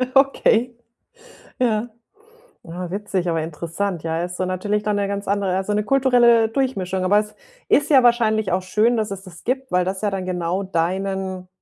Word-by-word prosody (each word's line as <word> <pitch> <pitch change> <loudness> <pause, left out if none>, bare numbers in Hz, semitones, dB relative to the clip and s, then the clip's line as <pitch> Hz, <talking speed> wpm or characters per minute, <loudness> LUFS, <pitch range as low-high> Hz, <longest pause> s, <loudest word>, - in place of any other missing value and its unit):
Okay, 250 -3 +3 0.9
ja. 230 -1 +1 0.8
Ah, 175 +1 -6
witzig, 195 -2 -2
aber 165 -1 0
interessant, 170 +3 -4
ja. 165 +1 -2
Ist 175 0 -5
so 185 - -1
natürlich 205 +3 -1
dann 210 -1 0
'ne 200 -1 0
ganz 200 0 -4
andere 200 -2 0
also, 195 +2 -1
'ne 210 0 +1
kulturelle 245 -3 +4
Durchmischung. 195 -7 -2
Aber 205 +3 +4
es 210 0 -5 0.3
ist 290 - +3
ja 270 -4 +6
wahrscheinlich 220 -4 +2
auch 185 - +1
schön, 215 +6 +2
dass 215 -2 -1
es 195 0 -6
das 175 -3 -13
gibt, 265 +2 -2
weil 180 0 +2
das 190 +1 -3
ja 210 - +1
dann 190 -1 -3
genau 180 +1 -2
deinen 190 +1 -2
200 Hz, 180 wpm, -21 LUFS, 185-225 Hz, 0.9 s, ja